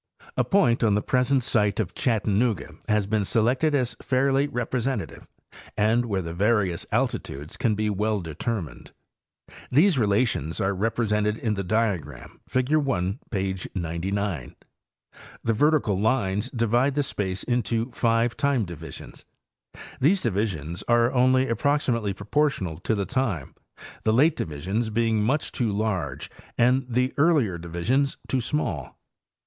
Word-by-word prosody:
A - - +2
point 155 -13 +3
on 105 -3 +3
the 105 - +1
present 130 +1 +2
site 105 -4 +1
of 100 -4 -1
Chattanooga 110 -2 0 0.2
has 105 -1 +2
been 105 +1 0
selected 125 +9 +2
as 125 -3 0
fairly 135 +1 +2
representative 120 - -3 0.5
and 110 +3 +3
where 95 -4 -1
the 85 0 -5
various 95 -2 +1
alti - - +1
tudes 75 +3 -9
can 110 -3 +1
be 105 +1 -1
well 105 +1 0
determined. 80 - -5 0.8
These 155 +3 +4
relations 100 - +1
are 95 +1 +1
represented 105 +1 0
in 110 -2 -1
the 100 -1 -3
diagram, 95 - -2
figure 130 +4 +2
1, 100 -7 -1
page 95 -3 -3
99. 85 -2 -3 0.9
The 115 - +1
vertical 140 -6 +2
lines 105 -1 +1
divide 120 +3 +1
the 145 - +2
space 95 -7 -3
into 120 0 -1
five 115 0 +1
time 140 -6 +1
divisions. 85 -4 -9 0.8
These 180 +8 +3
divisions 90 -5 -2
are 120 0 +4
only 130 +1 +4
approximately 115 -4 0
proportional 100 - -1
to 110 - 0
the 100 -1 -1
time, 115 - -2 0.5
the 110 - +2
late 150 +7 +4
divisions 95 - -2
being 110 0 +1
much 135 +8 0
too 120 -5 -1
large 95 -10 -2 0.3
and 125 +2 +3
the 125 +2 +1
earlier 140 - +3
divisions 85 +12 0
too 130 - 0
small. 110 - -3
110 Hz, 135 wpm, -25 LUFS, 95-130 Hz, 0.9 s, These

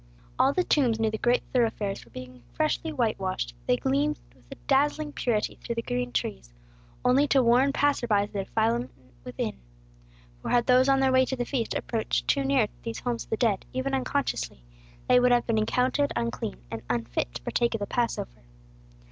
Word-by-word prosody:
All 270 - +5
the 365 +5 +1
tombs 250 -10 +2
near 220 -1 +1
the 220 - -4
great 245 +1 +2
thoroughfares 220 -5 0
were 115 - -20
being 125 +1 -10
freshly 310 +1 0
white 240 -7 0
washed; 185 - -3
they 125 - +3
gleamed 140 +3 0 0.2
with 130 - -24
a - - -8
dazzling 295 +2 +1
purity 220 -4 -1
through 235 - -4
the 230 - -2
green 125 - -2
trees, 65 - -3 0.5
only 270 +4 +4
to 270 -2 +4
warn 245 +4 +4
passers 285 -3 +1
by 205 -3 +3
of 205 - -8
the 200 -1 -2
defilement 230 +4 0 0.3
within. 125 - -4 0.8
For - - -5
had 240 -1 +3
those 255 +1 +5
on 270 0 +4
their 265 -1 +3
way 260 0 +5
to 265 - -3
the 245 -1 -2
feast 235 -3 -2
approached 225 -2 -1
too 280 - +2
near 270 -5 +2
these 230 -1 -5
homes 240 -2 -2
of - - -28
the 220 - -1
dead, 215 -5 +1
even 260 +1 -2
unconsciously, 265 - -2 0.4
they 250 - +6
would 250 0 +4
have 245 -1 +3
been 225 -2 +1
accounted 255 +6 +1
unclean, 115 - -2 0.2
and 110 - -4
unfit 120 - -2
to - - -6
partake 235 - 0
of - - -3
the 205 - -2
Passover. 215 - -2
235 Hz, 200 wpm, -27 LUFS, 195-260 Hz, 0.8 s, they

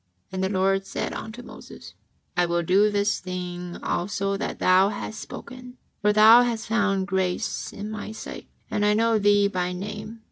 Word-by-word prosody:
'' 90 - -44
And 190 0 -2
the 190 - +1
Lord 195 0 +1
said - - -3
unto 230 +3 -7
Moses: - - -12 0.4
"I 175 0 +2
will 170 0 0
do 195 +5 +4
this 205 0 +1
thing 180 -1 -6
also 195 +2 -1
that - - -4
thou 185 +2 +4
hast 215 +1 -6
spoken, 250 +1 -10 0.2
for 210 0 +4
thou 220 +3 +8
hast 235 -2 -1
found 200 -4 +1
grace 190 +1 -2
in 210 +1 -6
My 215 0 -6
sight, 220 - -8 0.2
and 210 - 0
I 210 0 +3
know 225 0 +3
thee 205 0 +4
by 180 -2 -2
name. 210 +4 -7
200 Hz, 180 wpm, -25 LUFS, 185-215 Hz, 0.4 s, thou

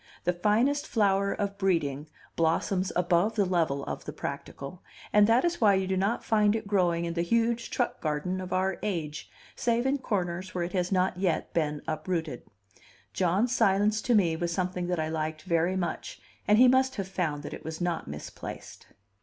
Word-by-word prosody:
The 180 - +1
finest 225 +11 +1
flower 200 -2 +2
of 200 -1 -3
breeding 155 -6 0 0.3
blossoms 180 +3 +1
above 180 +5 +2
the 205 -3 +2
level 165 -6 0
of - - -5
the - - -5
practical, 140 +6 -7 0.3
and 210 0 +6
that 235 +7 +4
is 345 -4 -1
why 205 -3 +6
you 190 0 +1
do 190 0 -1
not 200 +5 0
find 210 -1 +3
it 225 - -3
growing 175 -4 +1
in 170 - -3
the 170 - 0
huge 230 +5 +1
truck 245 - -1
garden 160 +5 -2
of 185 -1 -7
our 190 0 0
age, 160 -7 -3 0.3
save 235 +1 0
in 275 +1 +1
corners 185 -6 -3
where 175 - 0
it 175 - -5
has 180 -1 0
not 185 -1 +1
yet 185 -3 -1
been 150 -3 -1
uprooted. 155 -3 -2 0.7
John's 195 +7 +1
silence 210 0 +3
to 245 - +2
me 175 -6 +3
was 170 +1 -2
something 180 0 -2
that 180 -2 -1
I 155 - 0
liked 155 0 -3
very 170 0 +1
much, 175 -3 -3 0.3
and 210 - +5
he 255 +2 +8
must 260 +1 +3
have 195 -3 -3
found 160 -6 -2
that - - -6
it - - -8
was 160 0 -6
not 175 -2 -2
misplaced. 75 +1 -8
185 Hz, 190 wpm, -28 LUFS, 170-210 Hz, 0.7 s, he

